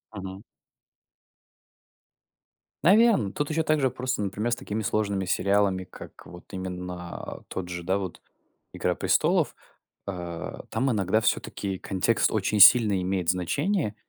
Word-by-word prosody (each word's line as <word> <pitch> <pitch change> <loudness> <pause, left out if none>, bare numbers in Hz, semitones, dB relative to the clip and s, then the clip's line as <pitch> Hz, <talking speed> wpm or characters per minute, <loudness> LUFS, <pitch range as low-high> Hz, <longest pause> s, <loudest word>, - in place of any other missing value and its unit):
Мгм. 95 0 -7 2.4
Наверно, 200 - +5
тут 145 +1 -2
ещё 160 +1 0
также 150 -4 +2
просто, 130 -2 -3
например, 105 +4 -2
с - - +1
такими 110 -4 -4
сложными 100 -2 -1
сериалами, 100 0 +1
как, - - -13
вот 90 +1 -12
именно, 90 -1 -6
а, - - -8
тот 90 -2 -5
же, 90 -1 -6
да, 95 +3 +1
вот 95 -4 -6 0.5
"Игра - - -1
престолов", - - +2 0.5
а, 85 -3 -6
там 130 +4 0
иногда 105 0 +1
всё-таки 100 -3 -2
контекст 100 +4 +1
очень 105 0 0
сильно 105 -3 +7
имеет 90 -1 -2
значение. 110 - 0
100 Hz, 130 wpm, -26 LUFS, 95-120 Hz, 2.4 s, сильно